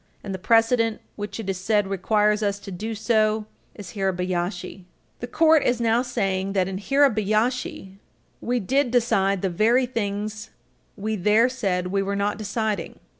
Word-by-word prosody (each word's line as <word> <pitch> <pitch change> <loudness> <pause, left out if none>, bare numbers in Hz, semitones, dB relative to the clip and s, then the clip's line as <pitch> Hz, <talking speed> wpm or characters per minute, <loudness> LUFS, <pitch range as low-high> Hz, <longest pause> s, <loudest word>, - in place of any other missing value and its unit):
And 195 - -5
the 190 - -5
precedent 225 +1 +2 0.2
which 205 +2 -6
it 220 - -6
is 190 -1 -2
said 205 +2 +1
requires 210 +2 +1
us 200 -1 0
to 200 - -9
do 220 +5 -5
so 215 -1 +1 0.3
is 195 -5 -9
Hirabayashi. 180 -1 -3 0.3
The 245 - -5
Court 315 +3 +4
is 245 -1 +1
now 230 0 +2
saying 195 -6 -2
that, 185 -2 +1
in 190 -1 -4
Hirabayashi, 220 -5 0 0.4
we 245 +1 0
did 260 +6 +1
decide 200 -6 +1
the 190 - +1
very 230 +8 +3
things 215 -2 -4 0.5
we 215 +2 -2
there 210 +4 +3
said 185 -8 -2
we 195 0 +1
were 200 +1 -2
not 205 +1 -1
deciding. 210 -3 -3
210 Hz, 160 wpm, -24 LUFS, 195-230 Hz, 0.5 s, Court